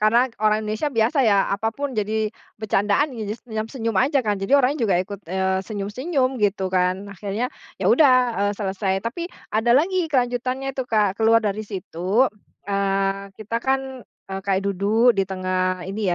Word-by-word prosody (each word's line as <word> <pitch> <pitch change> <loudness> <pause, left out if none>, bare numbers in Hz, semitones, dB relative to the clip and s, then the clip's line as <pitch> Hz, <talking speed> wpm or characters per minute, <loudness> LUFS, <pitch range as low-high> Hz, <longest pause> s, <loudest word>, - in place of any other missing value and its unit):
karena 235 +4 +3
orang 215 0 +2
Indonesia 215 +7 -1
biasa 230 +3 +1
ya 200 -2 +3
apapun 225 +8 -2
jadi 215 -2 -1 0.2
bercandaan 210 +6 +1
ya 225 -4 -5
jadi 210 - -3
senyam-senyum 225 -1 -3
aja 275 +5 +3
kan, 210 -3 -1
jadi 195 +8 +1
orangnya 255 -1 +1
juga 195 - +2
ikut, 200 +1 -8
eee, 190 +1 0
senyum-senyum 255 - -1
gitu 195 -2 +1
kan. 185 +2 0
Akhirnya 200 +6 -3 0.3
ya - - -1
udah, 285 -5 +6 0.3
eee, 205 - 0
selesai, 195 -1 -1
tapi 305 +9 -4 0.3
ada 230 +3 +3
lagi 350 +4 +2
kelanjutannya 255 -1 -1
itu, 260 -1 -4
Kak. 210 -4 +1
Keluar 225 0 +4
dari 210 +1 -2
situ, 195 +4 0 0.3
eee, 195 0 0
kita 215 +2 -4
kan, 265 +2 +1 0.5
eee, 190 0 -3
kayak 195 -1 +1
duduk 200 +4 +2
di 195 - +2
tengah 185 -1 -1
ini 190 0 -1
215 Hz, 165 wpm, -23 LUFS, 195-245 Hz, 0.5 s, udah